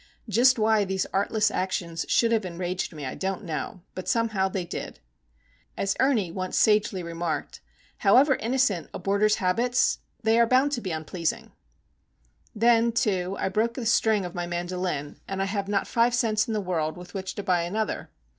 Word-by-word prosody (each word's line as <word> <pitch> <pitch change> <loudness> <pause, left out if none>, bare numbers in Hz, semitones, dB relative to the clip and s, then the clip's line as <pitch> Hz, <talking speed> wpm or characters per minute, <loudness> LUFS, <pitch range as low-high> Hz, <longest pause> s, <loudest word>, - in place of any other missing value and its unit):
Just 245 +4 +4
why 220 -1 +3
these 190 -1 -1
artless 210 +2 +1
actions 170 -3 -2
should 230 -1 +3
have 225 -2 +2
enraged 180 0 -3
me 150 -4 -7
I 130 - -4
don't 195 +2 -3
know; 170 +2 -5
but, 185 - -7
somehow, 220 -5 +1
they 185 -2 -3
did. - - -6 0.8
As 195 0 0
Ernie 235 -10 +2
once 185 +1 -3
sagely 210 -4 +3
remarked,—"However 175 - 0
innocent 230 -7 0
a - - -2
boarder's 200 +3 +2
habits, 240 +8 +1 0.2
they 225 +1 +3
are 235 - +5
bound 260 +4 +3
to 250 -4 -2
be 190 - -4
unpleasing." 160 +1 -3 1.0
Then, 230 +1 +4
too, 195 -5 0
I - - 0
broke 225 +5 0
a 250 - -3
string 220 -3 +2
of 175 - -6
my 175 0 -3
mandolin, 175 -4 -3
and 195 0 -4
I 195 - +1
have 200 0 -2
not 200 -1 0
five 235 +1 +2
cents 220 -3 +1
in 225 - -2
the 210 - 0
world 165 -4 -2
with 180 0 -11
which 190 -1 -5
to 205 - -4
buy 180 -3 +2
another. 210 +6 -3
195 Hz, 175 wpm, -26 LUFS, 180-225 Hz, 1.0 s, are